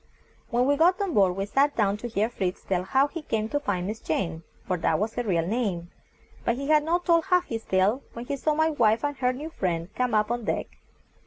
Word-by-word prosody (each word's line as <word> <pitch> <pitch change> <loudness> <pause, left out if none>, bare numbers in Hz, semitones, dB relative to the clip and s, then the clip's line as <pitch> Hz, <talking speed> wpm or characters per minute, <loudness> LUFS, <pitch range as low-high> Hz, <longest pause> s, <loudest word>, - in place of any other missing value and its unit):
When 245 +1 +2
we 285 +1 +2
got 355 +5 +4
on 395 -4 -1
board 190 -5 +3
we 195 +1 -2
sat 280 +7 +2
down 205 -3 +2
to 240 - -5
hear 220 -2 0
Fritz 185 -6 -3
tell 185 -2 0
how 265 +9 +2
he 330 +2 -7
came 220 -6 -2
to 290 - 0
find 190 -10 -2
Miss 215 +3 -4
Jane, 165 0 -2 0.2
for 185 - 0
that 165 - +1
was 215 +2 -2
her - - -1
real 175 -8 0
name; 185 -5 -2 0.5
but 235 - +1
he 275 +3 -5
had 305 -1 +5
not 345 +3 0
told 335 -1 +3
half 360 -2 +3
his 225 -1 -5
tale 195 +7 +2
when 235 +1 -7
he 280 - -2
saw 300 +2 0
my 315 +1 +2
wife 230 -5 +2
and 290 -1 -1
her 250 -1 +2
new 295 +6 -6
friend 175 - -2
come 250 -3 0
up 210 +1 +2
on 240 -2 -2
deck. - - -3
235 Hz, 245 wpm, -26 LUFS, 195-290 Hz, 0.5 s, had